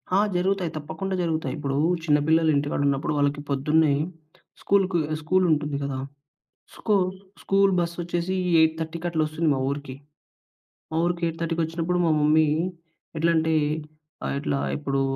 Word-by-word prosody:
ఆ! - - +5 0.2
జరుగుతాయి. 180 -1 0
తప్పకుండా 190 +5 -4
జరుగుతాయి. 160 -6 -1
ఇప్పుడు 140 -2 -2 0.3
చిన్న 150 -3 +4
పిల్లలు 160 0 +4
ఇంటికాడ 145 0 0
ఉన్నప్పుడు 140 +2 0
వాళ్ళకి 145 0 +1
పొద్దున్నే 150 +2 +2 0.7
స్కూల్‌కి 190 -3 +2 0.2
స్కూలుంటుంది 155 -4 +1
కదా! 140 -1 -3 0.8
స్కు 215 - 0 0.5
స్కూల్ 195 0 +3
బస్ 170 0 0
వచ్చేసి 175 +2 -2 0.3
8.30కి 160 +1 0
అట్ల 165 -2 -1
వస్తుంది 155 +1 -1
మా 135 - 0
ఊరికి. 140 -2 -4 1.0
మా 160 - -3
ఊరికి 175 0 -1
8.30కి 165 0 -2
వచ్చినప్పుడు 165 +2 -1
మా 165 - +3
మమ్మీ 155 +1 +4 0.7
ఎట్లా 165 +2 +2
అంటే 160 0 +2 0.7
ఆహ్, - - -2
ఇట్లా 140 -1 -1 0.2
ఇప్పుడు 140 -2 -1
160 Hz, 135 wpm, -25 LUFS, 145-175 Hz, 1.0 s, ఆ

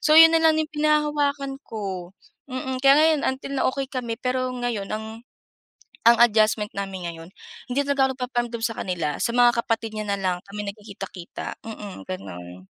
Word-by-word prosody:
So, 305 - +5
'yon 325 0 +10
na 330 - +5
lang 320 -1 +5
'yong 315 0 -1
pinanghahawakan 295 -2 +1
ko. 190 -4 -5 0.3
Mm, 260 0 -3
kaya 275 0 +7
ngayon 310 -1 +4
until 265 +1 -4
na - - +1
okey 270 0 -3
kami 245 -3 -3
pero 255 +2 -1
ngayon 240 -5 -3
ang 220 +2 -6 0.8
ang 235 - +7
adjustment 215 -2 +4
namin 195 -2 -4
ngayon, 165 0 -8 0.4
hindi 265 +3 +1
talaga 270 -2 +2
nagpaparamdam 240 -2 -2
sa 230 -1 -1
kanila. 170 -5 -2
Sa 235 - 0
mga 245 0 +6
kapatid 225 -1 -1
niya 215 - -3
na 200 0 0
lang, 185 -2 0
kami 210 +1 -5
nagkikita-kita. 200 -4 -8
Mm, 210 -3 -8
gano'n. 90 - -8
235 Hz, 170 wpm, -24 LUFS, 200-270 Hz, 0.8 s, yon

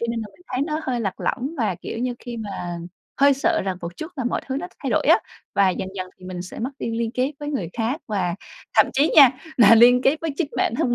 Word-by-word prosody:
Cho 235 - -1
nên 230 -1 -2
là 215 - -5
mình 355 - -22
thấy 255 - 0
nó 305 0 -2
hơi 245 -2 -2
lạc 195 -4 -3
lõng 275 +6 -2
và, 210 -6 +1
kiểu 185 - -7
như, 245 0 -1
khi 240 -1 -7
mà 190 -5 -5 0.4
hơi 280 0 +6
sợ 325 +4 +1
rằng 190 -2 -2
một 170 0 -7
chút 315 +3 -7
là 260 - -3
mọi 245 - 0
thứ 265 0 -2
nó 350 +5 -3 0.2
thay - - -2
đổi - - +1
á, - - +7 0.4
và 200 -1 +4
dần 185 - -4
dần 185 0 -3
thì 185 - -14
mình 180 -1 -5
sẽ 180 - -9
mất 250 +4 -2
đi 230 - -3
liên 230 -1 -1
kết 260 +4 0
với 290 - -4
người 255 - -2
khác 240 +7 -2
và 185 -5 -1 0.4
thậm - - +6
chí 285 +4 +2
nha 275 -4 +10 0.3
là 230 -2 +8
liên 245 +2 +7
kết 275 +4 +3
với 325 - -2
chính 300 -3 -1
bản 230 - +1
thân 240 - +1
240 Hz, 275 wpm, -23 LUFS, 195-275 Hz, 0.4 s, nha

